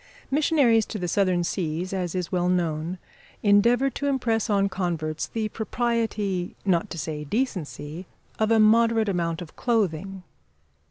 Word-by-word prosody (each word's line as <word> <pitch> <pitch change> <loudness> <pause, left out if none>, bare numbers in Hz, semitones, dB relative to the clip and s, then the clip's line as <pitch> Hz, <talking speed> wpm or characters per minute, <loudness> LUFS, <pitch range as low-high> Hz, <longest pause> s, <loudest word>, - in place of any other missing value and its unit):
Missionaries 275 -7 +3
to 215 - -5
the 180 -3 -3
Southern 185 -1 +2
seas, 170 +1 -2
as 180 -2 -2
is 180 -2 -3
well 180 -1 +1
known, 170 -1 -1 0.5
endeavour 235 +6 +4
to 285 - -3
impress 240 -5 0
on 200 -1 +3
converts 170 -5 -2
the 220 -1 -2
propriety, 220 -5 -1
not 185 +1 +1
to 170 - -6
say 155 -1 -4
decency, 175 - -3 0.3
of 220 0 +2
a 225 -1 +4
moderate 225 0 +4
amount 170 -2 -1
of 160 - -15
clothing. 195 -5 -1
195 Hz, 145 wpm, -25 LUFS, 175-225 Hz, 0.5 s, endeavour